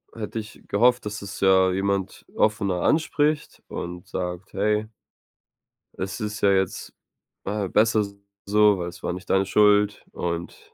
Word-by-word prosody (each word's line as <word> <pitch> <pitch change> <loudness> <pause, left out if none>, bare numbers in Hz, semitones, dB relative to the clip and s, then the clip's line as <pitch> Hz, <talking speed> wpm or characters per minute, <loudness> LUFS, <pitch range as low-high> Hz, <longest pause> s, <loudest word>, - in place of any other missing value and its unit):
hätte 110 0 -4
ich 110 +2 -10
gehofft, 120 +4 +3
dass 105 0 -5
es 100 0 -7
ja 95 -1 +5
jemand 95 0 -2
offener 100 -4 +1
anspricht 155 -1 +1
und 90 0 -6
sagt: 90 +1 -5
„Hey" 105 +2 +1 1.1
„es 95 +3 -4
ist 105 -1 -4
ja 100 - +5
jetzt, 95 -2 -1 0.5
äh, 100 -1 -2
besser 110 +1 +3 0.4
so, 105 -1 +4
weil 85 0 -3
es 85 - -14
war 90 - -1
nicht 90 +1 -9
deine 95 0 +3
Schuld“ 105 +1 +3
und 85 0 -5
100 Hz, 145 wpm, -24 LUFS, 95-105 Hz, 1.1 s, ja